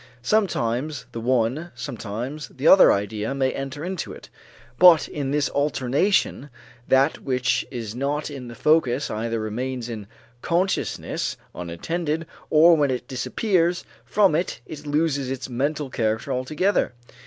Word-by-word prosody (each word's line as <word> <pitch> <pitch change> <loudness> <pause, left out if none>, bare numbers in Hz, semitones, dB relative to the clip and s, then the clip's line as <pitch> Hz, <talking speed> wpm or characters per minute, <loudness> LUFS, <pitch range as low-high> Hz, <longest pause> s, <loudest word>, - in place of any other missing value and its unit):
Sometimes 145 - 0
the 115 - -5
one, 130 +7 0
sometimes 120 +5 -5
the 135 +4 -3
other 190 - +8
idea 105 +5 -1
may 130 -1 +1
enter 135 +3 -5
into 185 -2 -4
it, - - -11 0.5
but 175 -4 +7
in 140 -3 -4
this 145 0 +1
alternation 145 +2 +1 0.4
that 135 +3 +3
which 125 -2 0
is 115 -5 -5
not 145 +4 -2
in 130 -3 -7
the 120 - -9
focus 145 -1 +2
either 115 +1 -2
remains 120 +3 -3
in 110 -4 -6 0.3
consciousness 180 +3 -1 0.2
unattended 155 - -3 0.2
or 165 +2 +7
when 145 -3 +2
it 125 -1 -3
disappears 175 - 0 0.2
from 200 -5 +3
it 170 +4 -1
it 150 -1 -9
loses 145 -3 0
its 130 0 -4
mental 140 +3 -2
character 110 +3 -1
altogether. 150 +6 0
135 Hz, 135 wpm, -24 LUFS, 120-155 Hz, 0.5 s, other